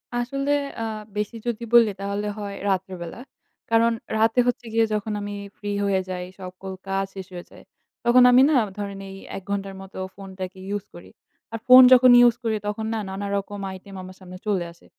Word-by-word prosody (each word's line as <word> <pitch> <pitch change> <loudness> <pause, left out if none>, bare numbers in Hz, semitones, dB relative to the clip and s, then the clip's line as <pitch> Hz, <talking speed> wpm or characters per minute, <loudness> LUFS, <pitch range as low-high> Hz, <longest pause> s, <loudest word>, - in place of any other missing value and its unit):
আসলে 275 +4 -1 0.3
আ - - -1 0.3
বেশি 210 +2 -2
যদি 235 0 -2
বলি 230 -2 +7
তাহলে 200 +1 -2
হয় 200 -1 -5
রাত্রেবেলা। 185 0 -3 0.5
কারণ 230 +1 +4 0.3
রাতে 225 +3 +3
হচ্ছে 245 0 -1
গিয়ে 225 0 +4
যখন 210 0 -2
আমি 205 0 -5 0.2
free 205 -1 -3
হয়ে 195 -1 +2
যাই, 180 -1 -4 0.2
সকল 185 +1 -8 0.2
কাজ 195 0 0
শেষ 190 -1 -7
হয়ে 175 -1 -8
যায়, - - -15 0.4
তখন 250 +1 +6
আমি 250 +1 +7
না 295 - +4 0.2
ধরেন 200 -1 -5
এই 195 - -9 0.2
১ 195 - -9
ঘণ্টার 195 -1 -3
মতো 195 - -12 0.2
phone 195 -1 -10
টাকে 185 +1 -6 0.2
use 205 - -6
করি। 90 +2 -12 0.4
আর 225 - -4
phone 255 0 +10
যখন 255 0 +7 0.2
use 235 - +1
করি 220 -1 0
তখন 220 +1 -3
না 220 - -1
নানা 200 +1 -4
রকম 200 +1 -5 0.2
item 195 +1 -12
আমার 185 0 -11
সামনে 185 -1 -11
চলে 190 -5 0
আসে। 170 - -24
200 Hz, 190 wpm, -24 LUFS, 190-225 Hz, 0.5 s, phone